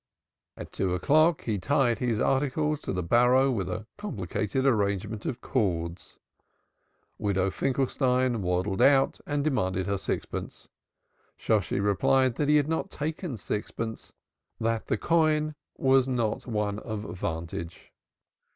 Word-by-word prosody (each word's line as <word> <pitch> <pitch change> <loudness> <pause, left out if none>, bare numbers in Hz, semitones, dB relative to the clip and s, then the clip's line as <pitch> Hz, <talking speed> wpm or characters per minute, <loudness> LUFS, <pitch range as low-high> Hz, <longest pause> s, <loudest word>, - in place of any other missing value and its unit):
At - - -8
two 90 -2 -1
o'clock 155 - +3
he 105 -4 -1
tied 120 -1 +2
his 120 -4 0
articles 145 +4 +1
to - - -4
the 90 -2 -2
barrow 125 +8 +4
with 95 -7 -2
a 100 +4 -4
complicated 110 - -2
arrangement 105 -3 0
of 125 - -4
cords. 85 -8 -2 1.0
Widow 95 -2 +1
Finkelstein 130 -1 +1
waddled 90 +2 0
out 135 -1 +4
and 145 -1 0
demanded 95 -11 0
her 100 -1 -1
sixpence. - - -5 0.7
Shosshi 105 -5 0
replied 120 +6 +3
that 145 -1 0
he 150 - +5
had 145 -1 +3
not 160 +4 -1
taken 155 - -4
sixpence, 110 +2 -5 0.5
that 115 0 -1
the - - +1
coign 155 +1 +2 0.2
was 135 -1 +4
not 120 -4 -1
one 105 -3 -1
of 110 -3 -5 0.2
vantage. 85 0 -5
115 Hz, 130 wpm, -27 LUFS, 100-135 Hz, 1.0 s, he